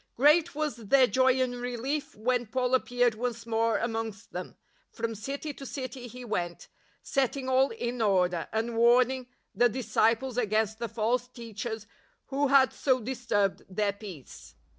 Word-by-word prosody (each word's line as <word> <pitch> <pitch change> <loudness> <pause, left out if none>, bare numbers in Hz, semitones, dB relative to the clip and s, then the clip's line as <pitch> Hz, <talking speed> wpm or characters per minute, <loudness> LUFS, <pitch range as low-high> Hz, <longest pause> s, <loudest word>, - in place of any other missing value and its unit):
Great 305 +5 +4
was 300 -3 -2
their 255 +4 +4
joy 260 +3 +3
and 250 -1 0
relief 270 +5 -3
when 245 +2 0
Paul 250 +2 -1
appeared 245 -2 +2
once 235 0 -4
more 225 -1 +1
amongst 225 -2 -4
them. - - -6 0.4
From 230 0 -3
city 275 +7 -5
to 275 - -11
city 255 -2 -6
he 250 +1 -9
went, 175 -6 -3 0.3
setting 270 -1 0
all 260 +1 +4
in 240 +1 -4
order, 180 -5 +2
and 225 +1 -1
warning 245 +2 +4 0.3
the 245 +1 +4
disciples 230 +1 +1
against 220 -1 0
the 235 -1 -3
false 235 +3 0
teachers 225 -2 -6 0.4
who 280 +1 +1
had 270 -1 +5
so 260 -2 +2
disturbed 225 -5 -1
their 200 +1 0
peace. 195 - -11
240 Hz, 150 wpm, -29 LUFS, 220-260 Hz, 0.4 s, had